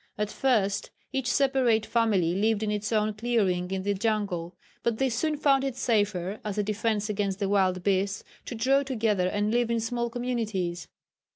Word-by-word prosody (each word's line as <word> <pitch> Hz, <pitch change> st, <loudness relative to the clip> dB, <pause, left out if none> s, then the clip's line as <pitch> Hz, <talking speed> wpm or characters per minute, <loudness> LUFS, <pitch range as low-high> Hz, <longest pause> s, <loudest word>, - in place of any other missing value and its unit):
At 210 Hz, 0 st, -2 dB
first 215 Hz, -7 st, +1 dB, 0.2 s
each 265 Hz, -1 st, 0 dB
separate 260 Hz, -5 st, +2 dB
family 205 Hz, -8 st, +2 dB
lived 215 Hz, +2 st, +1 dB
in 210 Hz, -, 0 dB
its 210 Hz, +1 st, -2 dB
own 215 Hz, -1 st, +1 dB
clearing 205 Hz, -6 st, 0 dB
in 190 Hz, 0 st, -2 dB
the 205 Hz, +1 st, +1 dB
jungle, 195 Hz, -5 st, -2 dB, 0.2 s
but 235 Hz, -2 st, 0 dB
they 265 Hz, +1 st, +1 dB
soon 300 Hz, +6 st, -1 dB
found 275 Hz, -2 st, +3 dB
it 270 Hz, -3 st, -2 dB
safer, 205 Hz, -6 st, 0 dB
as 210 Hz, -1 st, -4 dB
a 210 Hz, -, +2 dB
defence 215 Hz, 0 st, -1 dB
against 200 Hz, -2 st, -1 dB
the 200 Hz, -, -1 dB
wild 190 Hz, -2 st, +2 dB
beasts, 200 Hz, +1 st, 0 dB, 0.2 s
to 245 Hz, -, -5 dB
draw 265 Hz, +5 st, +3 dB
together 220 Hz, -8 st, 0 dB
and 205 Hz, +3 st, 0 dB
live 240 Hz, 0 st, +1 dB
in 235 Hz, 0 st, +1 dB
small 235 Hz, +1 st, -2 dB
communities. 220 Hz, -9 st, -2 dB
215 Hz, 180 wpm, -27 LUFS, 195-235 Hz, 0.2 s, found